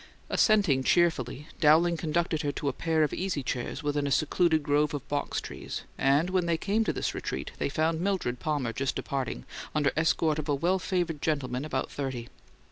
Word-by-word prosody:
Assenting 200 Hz, -, +4 dB
cheerfully, 150 Hz, -4 st, +1 dB
Dowling 165 Hz, +2 st, +5 dB
conducted 160 Hz, 0 st, 0 dB
her 145 Hz, -, -1 dB
to 140 Hz, -, -3 dB
a 140 Hz, -, +1 dB
pair 160 Hz, +2 st, +1 dB
of 150 Hz, -, 0 dB
easy 180 Hz, -7 st, -2 dB
chairs 125 Hz, +4 st, -3 dB
within 145 Hz, -1 st, 0 dB
a -, -, -2 dB
secluding 160 Hz, +3 st, +2 dB
grove 145 Hz, +1 st, +2 dB
of 140 Hz, -, -6 dB
box 145 Hz, 0 st, -1 dB
trees, -, -, -6 dB
and 145 Hz, +6 st, +2 dB
when 185 Hz, -2 st, +1 dB
they 165 Hz, -1 st, +2 dB
came 210 Hz, +6 st, +1 dB
to -, -, +1 dB
this -, -, -2 dB
retreat 65 Hz, -, -4 dB
they -, -, 0 dB
found 160 Hz, +3 st, 0 dB
Mildred 180 Hz, -11 st, -1 dB
Palmer 145 Hz, -7 st, -1 dB
just 135 Hz, +1 st, -1 dB
departing, 130 Hz, -, -3 dB, 0.3 s
under 145 Hz, -2 st, +3 dB
escort 155 Hz, -1 st, +2 dB
of 155 Hz, 0 st, -5 dB
a 145 Hz, -, +3 dB
well 175 Hz, +7 st, +1 dB
favoured 175 Hz, -5 st, -1 dB
gentleman 135 Hz, -4 st, -1 dB
about 135 Hz, -4 st, -2 dB
thirty. 130 Hz, -4 st, -4 dB
150 Hz, 190 wpm, -28 LUFS, 140-170 Hz, 0.3 s, Dowling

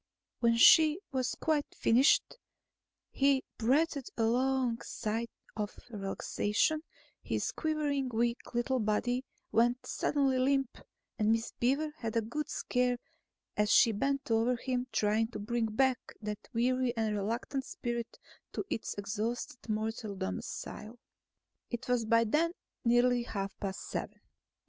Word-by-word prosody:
When 230 Hz, -1 st, +3 dB
she 310 Hz, +7 st, +7 dB
had 260 Hz, -1 st, +1 dB
quite 305 Hz, -2 st, 0 dB
finished, 255 Hz, -, +4 dB, 0.7 s
he 275 Hz, -1 st, +3 dB, 0.2 s
breathed 280 Hz, +4 st, +2 dB
a 230 Hz, -, +2 dB
long 250 Hz, 0 st, +1 dB
sigh 225 Hz, +1 st, -2 dB, 0.3 s
of 210 Hz, -1 st, -4 dB
relaxation; 210 Hz, +7 st, 0 dB, 0.4 s
his -, -, -1 dB
quivering, 295 Hz, -4 st, -1 dB
weak 235 Hz, +1 st, -1 dB
little 255 Hz, +2 st, +1 dB
body 245 Hz, +4 st, 0 dB, 0.3 s
went 240 Hz, +2 st, +2 dB
suddenly 275 Hz, -3 st, +1 dB
limp, 270 Hz, 0 st, +1 dB, 0.4 s
and 215 Hz, 0 st, +3 dB
Miss 225 Hz, 0 st, 0 dB
Beaver 280 Hz, +5 st, +1 dB
had 225 Hz, -4 st, -4 dB
a -, -, +3 dB
good 300 Hz, +7 st, -4 dB
scare 250 Hz, -1 st, 0 dB, 0.6 s
as 210 Hz, 0 st, +2 dB
she 230 Hz, -, +6 dB
bent 275 Hz, +4 st, -1 dB
over 225 Hz, +3 st, +3 dB
him, 250 Hz, +1 st, -2 dB
trying 215 Hz, +2 st, +2 dB
to -, -, -4 dB
bring 225 Hz, +2 st, -1 dB
back 255 Hz, +3 st, +2 dB, 0.2 s
that 210 Hz, -1 st, -6 dB
weary 250 Hz, 0 st, +1 dB
and 220 Hz, -2 st, 0 dB
reluctant 230 Hz, +6 st, -2 dB
spirit 235 Hz, -2 st, -4 dB, 0.4 s
to -, -, -3 dB
its 225 Hz, -, -2 dB
exhausted 225 Hz, +4 st, -4 dB
mortal 215 Hz, -1 st, -2 dB
domicile. 210 Hz, +3 st, -5 dB, 0.7 s
It 240 Hz, -, -5 dB
was 245 Hz, -2 st, +1 dB
by 230 Hz, +1 st, +4 dB
then 315 Hz, +9 st, +1 dB, 0.3 s
nearly 245 Hz, 0 st, +4 dB
half 200 Hz, -4 st, -4 dB
past 195 Hz, -1 st, -4 dB
seven. -, -, -5 dB
240 Hz, 130 wpm, -32 LUFS, 220-265 Hz, 0.7 s, she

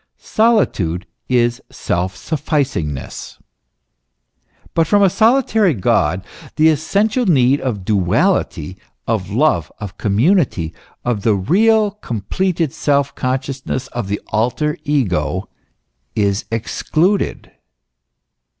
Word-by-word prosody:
Solitude 105 Hz, -, +1 dB, 0.2 s
is 120 Hz, -1 st, +2 dB
self 90 Hz, +2 st, -2 dB
sufficing 140 Hz, -, -1 dB
ness. 70 Hz, -1 st, -8 dB, 1.4 s
But 165 Hz, -1 st, +2 dB
from 205 Hz, +3 st, +4 dB
a 190 Hz, -, +4 dB
solitary 220 Hz, -, +3 dB
God 95 Hz, -1 st, +1 dB, 0.3 s
the 160 Hz, +1 st, +5 dB
essential 205 Hz, -, +1 dB
need, 135 Hz, -4 st, +3 dB
of 105 Hz, -8 st, -3 dB
duality, 95 Hz, -, 0 dB, 0.3 s
of 105 Hz, -5 st, -1 dB
love, 105 Hz, -, +1 dB
of 100 Hz, -2 st, -8 dB
community, 110 Hz, -, +1 dB, 0.3 s
of 120 Hz, -4 st, 0 dB
the 110 Hz, 0 st, +2 dB
real, 210 Hz, -, +3 dB
completed 165 Hz, -, -2 dB
self 140 Hz, -2 st, +1 dB
consciousness, 130 Hz, 0 st, -3 dB
of 120 Hz, -5 st, -4 dB
the 100 Hz, +1 st, -2 dB
alter 125 Hz, +7 st, 0 dB
ego, 95 Hz, -, 0 dB, 0.7 s
is 100 Hz, -1 st, 0 dB
excluded. 155 Hz, -, -1 dB
130 Hz, 100 wpm, -18 LUFS, -, 1.4 s, the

